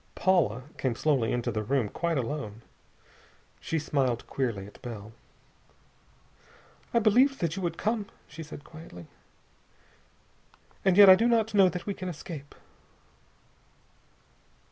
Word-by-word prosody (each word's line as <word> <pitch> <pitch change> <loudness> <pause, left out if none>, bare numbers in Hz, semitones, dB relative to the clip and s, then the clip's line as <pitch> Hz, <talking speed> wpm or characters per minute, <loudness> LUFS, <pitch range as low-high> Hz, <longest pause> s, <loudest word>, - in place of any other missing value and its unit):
Paula 165 - +2 0.2
came 130 -3 0
slowly 130 -5 +1
into 120 0 -1
the 110 0 -2
room 120 +1 0
quite 170 +8 -2
alone. 120 -4 -4 1.0
She 165 - -2
smiled 135 -6 -1
queerly 115 -8 -3
at 105 - -15
Bell. 110 -4 -8 1.8
"I - - +1
believed 245 +5 +4
that 165 -1 -1
you 195 - -4
would 170 -2 -2
come," 215 -2 -1 0.2
she 155 +2 -10
said 150 -2 -9
quietly. 150 - -12 1.8
"And 190 -1 +3
yet 205 -1 +10
I 190 - +11
do 225 +5 +3
not 225 -2 +2
know 195 -3 +6
that 180 -1 -6
we 200 - -2
can 185 -1 -6
escape." 150 -3 -8
155 Hz, 130 wpm, -28 LUFS, 120-190 Hz, 1.8 s, I